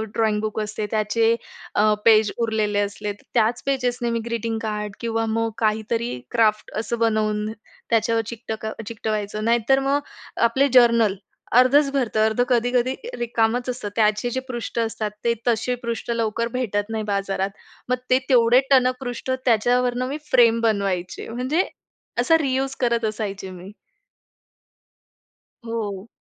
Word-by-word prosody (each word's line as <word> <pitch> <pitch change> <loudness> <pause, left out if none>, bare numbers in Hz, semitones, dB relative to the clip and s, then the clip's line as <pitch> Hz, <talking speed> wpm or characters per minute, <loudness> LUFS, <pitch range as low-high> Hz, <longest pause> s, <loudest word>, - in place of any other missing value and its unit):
Drawing book 215 -1 0
असते 215 0 -3
त्याचे 225 +1 +2 0.4
अ, 215 +1 +4
page 215 -2 +6
उरलेले 220 -3 0
असले. 205 0 -2
त्याच 230 +3 0
पेजेसने 250 -3 0
मी 230 - 0
ग्रीटिंग-कार्ड 220 -3 -3
किंवा 225 -1 -1
मग 225 +1 0
काहीतरी 220 - -1
क्राफ्ट 215 -2 +2
असं 230 +1 -3
बनवून 215 -2 +1 0.4
त्याच्यावर 230 0 +2
चिकटक 220 -1 -6 0.2
चिकटवायचं. 215 -2 -3
नाहीतर 235 +3 +3
मग 275 +1 +1 0.5
आपले 265 +4 +2
जर्नल 235 -5 +5 0.4
अर्धच 275 +3 +5
भरतं, 240 -6 +1
अर्धं 220 +3 +2
कधी-कधी 245 +1 +2 0.2
रिकामंच 240 +1 0
असतं. 245 -4 -4
त्याचे 215 +1 +2
जे 260 - -2
पृष्ठ 240 -2 -4
असतात 220 -2 -2
ते 235 - +3
तसे 240 +2 +1
पृष्ठ 235 0 -3
लवकर 230 0 -1
भेटत 205 -4 -1
नाही 220 -1 -2
बाजारात. 195 -1 -1 0.4
मग 250 - +3
ते 255 0 +5
तेवढे 240 -1 +6
टणक 255 -1 +5
पृष्ठ 250 0 -4
त्याच्यावरनं 245 +2 +2
मी 280 +3 -3
फ्रेम 230 -2 +5
बनवायचे. 195 -5 -1
म्हणजे, 255 +9 0 0.6
असा 325 -2 +5
रियूज 270 -1 -1
करत 235 -2 +1
असायचे 205 -3 -4
मी. 185 +2 -10 1.9
हो. 215 -3 -4
230 Hz, 130 wpm, -23 LUFS, 215-245 Hz, 1.9 s, page